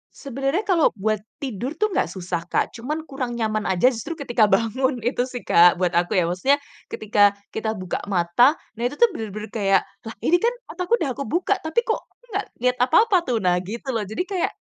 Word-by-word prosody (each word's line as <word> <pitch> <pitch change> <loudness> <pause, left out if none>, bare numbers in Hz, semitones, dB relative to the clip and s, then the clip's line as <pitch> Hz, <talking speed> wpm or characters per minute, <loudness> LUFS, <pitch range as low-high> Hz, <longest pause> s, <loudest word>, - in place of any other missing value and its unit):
Sebenarnya 275 - -2
kalau 355 - +2
buat 215 +1 0 0.2
tidur 255 +3 -4
tuh 425 +5 0
nggak - - +1
susah 175 -2 -5
Kak, - - 0
cuma 255 +6 -4
kurang 265 -5 -4
nyaman 215 -2 -1
aja 190 +7 +3
justru 255 +8 -5
ketika 240 -7 +2
bangun 240 +3 +1
itu 245 +1 0
sih 250 -2 -7
Kak, 175 +1 +6
buat 180 -1 0
aku 175 +1 +1
ya. 180 - +4
Maksudnya 185 +12 +2 0.3
ketika 205 -1 +2 0.2
kita 220 0 -2
buka 185 -3 -4
mata, 195 - +3 0.2
nah - - -2
itu 290 - -7
tuh 475 +4 +4
bener-bener 215 - -6
kayak, 195 -3 +2 0.2
"Lah 225 - -7
ini 350 +2 +4
kan 475 +5 +1 0.2
otakku 365 +6 +1
udah 320 - -2
kebuka, 345 - 0
tapi 320 +10 0
kok 445 - -1
aku - - -42
nggak 400 +2 -2 0.2
lihat 250 0 +2
apa-apa 370 - +4
tuh," 230 -5 0
nah 180 0 +3
gitu 230 +8 -5
loh. 220 -5 -2
Jadi 220 - -2
kayak 370 -2 -2
240 Hz, 200 wpm, -23 LUFS, 205-305 Hz, 0.3 s, Kak